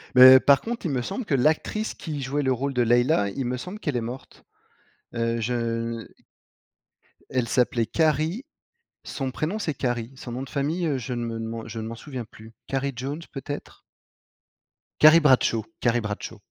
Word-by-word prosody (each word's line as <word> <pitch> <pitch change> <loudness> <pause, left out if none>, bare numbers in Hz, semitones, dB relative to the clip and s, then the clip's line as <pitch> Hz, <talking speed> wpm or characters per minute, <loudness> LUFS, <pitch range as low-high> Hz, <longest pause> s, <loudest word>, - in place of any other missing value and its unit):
Mais 130 +1 +11
par 140 +1 +5
contre, 235 -2 -5
il 160 - 0
me 130 -2 0
semble 195 - -4
que 150 - +1
l'actrice 155 - +1
qui 150 -4 -6
jouait 135 +2 -1
le 130 -2 +2
rôle 135 +3 -2
de 125 - +1
Leila, 120 -2 +3
il 130 +6 -4
me 125 +1 -2
semble 180 +11 -7
qu'elle 150 - -2
est - - -1
morte. 120 +4 -8 0.7
Heu, 115 0 0
je 115 -1 -2 1.2
elle 125 -3 -1
s'appelait 120 -2 +2
Carrie. 160 - 0 0.6
Son 135 -2 -4
prénom, 160 +10 -2
c'est 170 -8 -2
Carrie. 120 -2 -3
Son 125 -2 -8
nom 130 +2 -4
de 135 - -9
famille, 155 +5 -1
heu, 145 -4 0
je 125 +1 -5
ne 115 -1 -3
m'en 115 0 -5
je 115 0 -6
m'en 110 +1 -5
souviens 130 -1 -7
plus, 110 +1 -15
Carrie 135 0 -1
Jones, 140 +7 -5
peut-être? 145 +1 -7 1.2
Carrie 155 +2 +9
Bradshaw. 130 -6 +3 0.2
Carrie 120 0 +2
Bradshaw. 105 +1 -5
130 Hz, 175 wpm, -25 LUFS, 115-150 Hz, 1.2 s, Mais